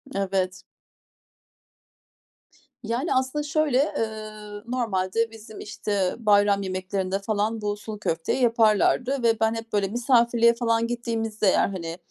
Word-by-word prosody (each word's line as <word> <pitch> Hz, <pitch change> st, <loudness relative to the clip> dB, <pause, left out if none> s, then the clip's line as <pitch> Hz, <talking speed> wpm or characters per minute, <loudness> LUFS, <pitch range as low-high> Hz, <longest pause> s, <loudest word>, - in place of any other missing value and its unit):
Evet. 190 Hz, -1 st, -1 dB, 2.2 s
Yani, 235 Hz, +8 st, -1 dB
aslında 260 Hz, +3 st, 0 dB
şöyle, 295 Hz, -1 st, +1 dB
ııı, 215 Hz, -2 st, -6 dB
normalde 225 Hz, -2 st, 0 dB
bizim, 220 Hz, -1 st, -12 dB
işte 200 Hz, -3 st, -2 dB
bayram 205 Hz, -2 st, +3 dB
yemeklerinde 190 Hz, 0 st, -2 dB
falan 215 Hz, +2 st, -1 dB
bu 205 Hz, 0 st, -2 dB
sulu 210 Hz, 0 st, -8 dB
köfteyi 165 Hz, +7 st, -1 dB
yaparlardı 235 Hz, +3 st, +3 dB
ve 225 Hz, -1 st, +3 dB
ben 220 Hz, 0 st, +2 dB
hep 225 Hz, 0 st, -7 dB
böyle 200 Hz, -1 st, +2 dB
misafirliğe 235 Hz, +1 st, +3 dB
falan 230 Hz, -1 st, 0 dB
gittiğimizde 225 Hz, -3 st, -2 dB
eğer, 190 Hz, -, +3 dB
hani, 170 Hz, -3 st, -5 dB
220 Hz, 120 wpm, -25 LUFS, 200-235 Hz, 2.2 s, bayram